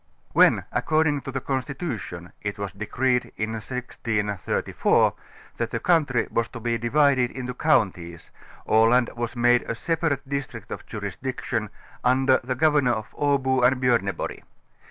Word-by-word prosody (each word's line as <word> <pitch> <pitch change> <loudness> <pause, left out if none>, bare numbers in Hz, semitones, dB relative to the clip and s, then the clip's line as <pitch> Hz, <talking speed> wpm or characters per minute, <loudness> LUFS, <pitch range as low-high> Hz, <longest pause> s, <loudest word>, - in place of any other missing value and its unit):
When - - +5
according 155 -2 +1
to 135 - -6
the 135 0 -3
constitution 130 - -4
it 100 -1 -4
was 100 -2 -4
decreed 125 +6 -1
in 110 +1 -2
1634 110 -4 0 0.4
that - - -1
the - - -3
country 150 -8 +2
was 115 - 0
to 120 - -9
be 115 0 -1
divided 130 +1 +3
into 125 -1 -5
counties, 90 - 0 0.4
Aland 115 +3 +4
was 120 +1 -4
made 120 0 +4
a 115 - -1
separate 155 0 -1
district 140 -4 -5
of - - -7
jurisdiction 110 +1 -4 0.3
under 130 +1 +4
the 130 +1 -2
go 155 +4 +4
vernor 140 -5 +3
of 110 -1 -5
Abo 135 -3 +1
and 125 +1 +4
Bjorneborg. 115 -8 0
125 Hz, 140 wpm, -25 LUFS, 110-135 Hz, 0.4 s, When